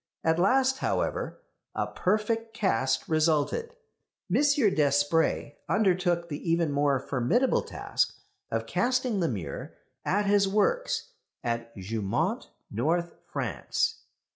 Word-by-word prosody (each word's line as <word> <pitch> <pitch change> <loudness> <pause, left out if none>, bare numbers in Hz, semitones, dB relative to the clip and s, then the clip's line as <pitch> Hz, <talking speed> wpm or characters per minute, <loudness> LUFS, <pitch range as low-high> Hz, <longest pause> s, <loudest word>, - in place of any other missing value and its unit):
At 160 +1 +2
last, 265 +7 +3
however, - - -2 0.3
a - - 0
perfect 225 +3 -1
cast 130 - +1
resulted. 160 - +1 0.6
M. - - +4
Despret 165 - +2
undertook 180 -4 +2
the 155 +2 -5
even 165 -2 +2
more 140 -1 +2
formidable 140 - +1
task - - -1 0.3
of - - -1
casting 250 -3 +1
the 170 - +2
mirror 90 - -5 0.3
at 205 +2 +1
his 200 0 +4
works 350 - 0 0.3
at 115 -1 -3
Jeumont, 100 +1 -2 0.2
North 165 +9 0 0.2
France. - - -1
170 Hz, 110 wpm, -28 LUFS, 145-225 Hz, 0.6 s, M